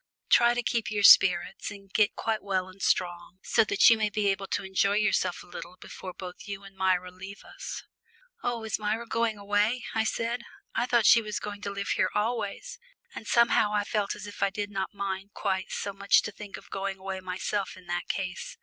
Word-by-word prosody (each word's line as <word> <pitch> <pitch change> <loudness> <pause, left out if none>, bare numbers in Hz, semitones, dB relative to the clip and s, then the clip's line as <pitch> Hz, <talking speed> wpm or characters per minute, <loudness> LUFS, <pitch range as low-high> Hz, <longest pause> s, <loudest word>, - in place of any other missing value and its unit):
Try 240 0 +6
to 245 - -1
keep 235 -2 0
up - - -4
your 205 -1 -1
spirits 180 -1 +6
and 195 -1 -12
get 210 -1 +3
quite 225 -1 -1
well 190 -2 -1
and 185 +1 -14
strong, 175 0 0
so - - +3
that 200 - +4
you 230 -1 +6
may 215 -1 +1
be 205 0 +1
able 195 0 -1
to 200 - -2
enjoy 195 +1 +1
yourself 200 -4 +1
a - - -16
little 175 0 -9
before 185 - -8
both 180 +2 -9
you 200 -1 -6
and 195 0 -13
Myra 185 -1 +1
leave 190 +2 -10
us." - - -7 0.6
"Oh, 240 -2 -2
is 220 -1 -2
Myra 215 +2 -1
going 230 -1 0
away?" 205 +4 0
I 220 -1 +2
said. 230 +2 -1 0.3
"I 240 +2 0
thought 240 -3 +3
she 230 - +7
was 210 -1 -4
going 205 -1 -6
to 200 - -3
live 200 0 -4
here - - +2
always," 225 - -2 0.3
and 220 - -8
somehow 235 -3 +4
I 205 - +2
felt 205 -1 -1
as 205 - -8
if 205 - -10
I 200 - +3
did 205 +1 -4
not 195 -1 -3
mind 195 0 -5
quite 190 -2 -1
so 200 - -3
much 200 +1 +3
to - - -4
think 205 0 -9
of - - -16
going 195 0 -3
away 190 0 -5
myself 185 +2 -3
in 185 - -15
that 175 0 -3
case. 190 - -4
200 Hz, 220 wpm, -28 LUFS, 190-215 Hz, 0.6 s, she